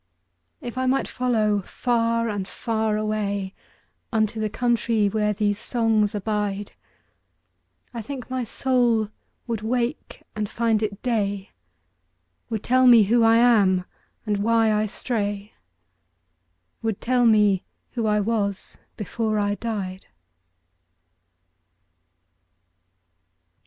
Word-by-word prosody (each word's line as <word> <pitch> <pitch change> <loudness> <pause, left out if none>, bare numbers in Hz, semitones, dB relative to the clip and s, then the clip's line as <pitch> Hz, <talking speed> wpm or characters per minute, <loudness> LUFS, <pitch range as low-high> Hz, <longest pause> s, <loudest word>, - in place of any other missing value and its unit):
If 245 +1 -5
I 260 - 0
might 265 +1 +1
follow 220 -5 +1
far 230 +2 0
and 205 -3 -3
far 220 -2 -1
awayUnto 215 +1 -3
the 215 -1 -2
country 230 -2 +1
where 210 +1 0
these 205 0 0
songs 220 -4 +1
abide,I 205 +3 -7
think 255 +2 -7
my 255 -1 -2
soul 240 -3 +1 0.4
would 230 -3 -3
wake 245 +4 -3
and 210 -1 -2
find 225 -2 +1
it 205 -2 -3
day, 205 -5 -1 1.0
Would 220 -2 -3
tell 255 +1 +4
me 235 -3 +8
who 230 +4 +3
I 225 0 +5
am, 205 -7 +4 0.4
and 210 -2 0
why 225 +1 +3
I 215 0 +1
stray,—Would 90 - -7
tell 245 0 +2
me 210 -4 +4 0.3
who 230 -3 -2
I 210 0 +2
was 205 -2 -2 0.2
before 215 +1 -2
I 205 0 +1
died. 200 -4 -5
215 Hz, 105 wpm, -24 LUFS, 205-230 Hz, 1.0 s, me